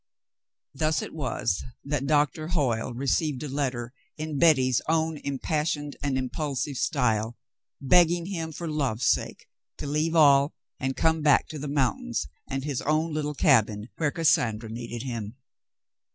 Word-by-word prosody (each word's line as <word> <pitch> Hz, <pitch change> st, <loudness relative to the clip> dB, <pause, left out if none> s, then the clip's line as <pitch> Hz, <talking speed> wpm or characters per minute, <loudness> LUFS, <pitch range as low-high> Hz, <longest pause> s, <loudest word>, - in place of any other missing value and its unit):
Thus 155 Hz, +2 st, 0 dB
it -, -, -8 dB
was 130 Hz, -, -1 dB, 0.2 s
that 140 Hz, -1 st, -1 dB
Doctor 150 Hz, +1 st, +1 dB
Hoyle 130 Hz, -11 st, 0 dB
received 135 Hz, +3 st, -1 dB
a -, -, -3 dB
letter 130 Hz, -3 st, -2 dB, 0.2 s
in 155 Hz, -2 st, -3 dB
Betty's 130 Hz, -7 st, +4 dB
own 160 Hz, -1 st, +1 dB
impassioned 145 Hz, +1 st, -2 dB
and 140 Hz, -2 st, 0 dB
impulsive 140 Hz, +1 st, -2 dB
style, 120 Hz, -9 st, 0 dB, 0.4 s
begging 170 Hz, +4 st, +4 dB
him, 165 Hz, -4 st, -4 dB
for 170 Hz, +2 st, -6 dB
love's 135 Hz, -6 st, -1 dB
sake, -, -, 0 dB, 0.3 s
to -, -, -6 dB
leave 155 Hz, +3 st, 0 dB
all 140 Hz, -2 st, +5 dB, 0.2 s
and 135 Hz, 0 st, -2 dB
come 160 Hz, 0 st, +2 dB
back 150 Hz, -2 st, +4 dB
to 155 Hz, -, -6 dB
the 145 Hz, -, -4 dB
mountains 130 Hz, -, 0 dB, 0.2 s
and 135 Hz, 0 st, -3 dB
his 145 Hz, -3 st, -2 dB
own 155 Hz, +2 st, 0 dB
little 150 Hz, -1 st, -2 dB
cabin, 110 Hz, -6 st, +3 dB
where 150 Hz, -3 st, +1 dB
Cassandra 120 Hz, -9 st, +1 dB
needed 115 Hz, 0 st, -6 dB
him. 115 Hz, -4 st, -5 dB
145 Hz, 145 wpm, -27 LUFS, 125-155 Hz, 0.4 s, all